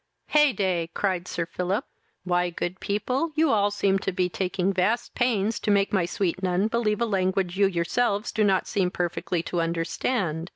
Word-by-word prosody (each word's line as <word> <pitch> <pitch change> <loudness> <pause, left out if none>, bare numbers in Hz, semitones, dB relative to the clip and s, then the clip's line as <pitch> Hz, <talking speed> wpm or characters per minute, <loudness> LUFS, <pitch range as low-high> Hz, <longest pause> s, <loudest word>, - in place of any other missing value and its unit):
"Hey 300 -2 +5
day! 185 -7 -1
(cried 185 -3 -1
Sir 170 - -2
Philip;) 185 - -2 0.4
why, 180 -1 +1
good 175 +2 -4
people, 255 +10 -1
you 315 -1 +3
all 205 -2 +3
seem 200 -1 +1
to 195 - -2
be 180 0 0
taking 185 +1 -1
vast 210 +6 0
pains 225 -3 +1
to - - -3
make 200 0 +2
my 190 -4 +2
sweet 185 0 -1
nun 185 +3 +1
believe 220 -2 0
a - - +3
language 190 -3 0
you 200 - +6
yourselves 200 +5 0
do 215 - +1
not 195 -2 +2
seem 190 -4 +1
perfectly 175 -1 -2
to 175 -1 -1
understand. 165 +1 -1
195 Hz, 180 wpm, -25 LUFS, 180-210 Hz, 0.4 s, you